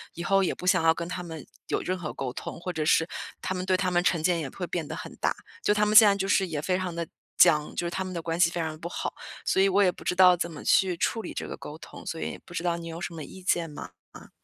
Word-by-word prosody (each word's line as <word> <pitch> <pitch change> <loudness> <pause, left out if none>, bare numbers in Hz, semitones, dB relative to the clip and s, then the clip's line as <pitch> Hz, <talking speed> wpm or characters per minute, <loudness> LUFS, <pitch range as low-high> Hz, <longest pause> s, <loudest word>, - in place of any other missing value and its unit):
“以 170 - -5
后 195 0 +3
也 - - +1
不 180 - -7
想 165 - +4
要 165 0 +5
跟 170 +1 -5
他 180 0 -4
们 160 -5 -8 0.2
有 - - +1
任 185 +1 -2
何 165 -4 -5
沟 130 -2 -4
通”， - - -7
或 180 0 -4
者 155 - -1
是 160 +2 +3 0.3
他 185 - -2
们 180 0 -3
对 185 -1 +2
他 185 -1 0
们 175 0 +2
成 170 -3 +2
见 175 0 +2
也 135 - -4
会 180 -2 -6
变 165 -3 -3
得 - - -6
很 - - -8
大， - - +2 0.3
就 210 - +4
他 210 0 +2
们 210 +1 +1
现 220 - +11
在 200 - +6
就 195 0 -2
是 195 -1 +3
也 150 -3 -3
非 185 +2 0
常 185 -2 -3
地 170 -1 -3 0.3
僵， 150 -1 +5
就 175 - -2
是 170 - -2
他 190 - -2
们 185 0 -6
的 170 - -3
关 165 +1 -3
系 170 -2 +6
非 175 - -4
常 155 -1 -4
不 170 - -5
好。 - - -4 0.3
所 190 - +3
以 195 - +5
我 200 +2 +4
也 180 - +4
不 - - -13
知 180 - 0
道 180 -1 +7
怎 170 0 -2
么 150 - -9
去 185 -3 +3
处 225 +6 0
理 180 - -7
这 - - -4
个 - - -6
沟 150 +1 -9
通， - - -12
所 165 - -4
以 - - -4
不 175 - -13
知 175 - -3
道 170 -1 0
你 165 0 -7
有 165 +1 -6
什 180 - -4
么 160 -2 -6
意 185 +6 -11
见 170 -3 +1
吗？ 145 -11 -8 0.2
嗯。 - - -13
175 Hz, 340 characters per minute, -27 LUFS, 165-185 Hz, 0.3 s, 现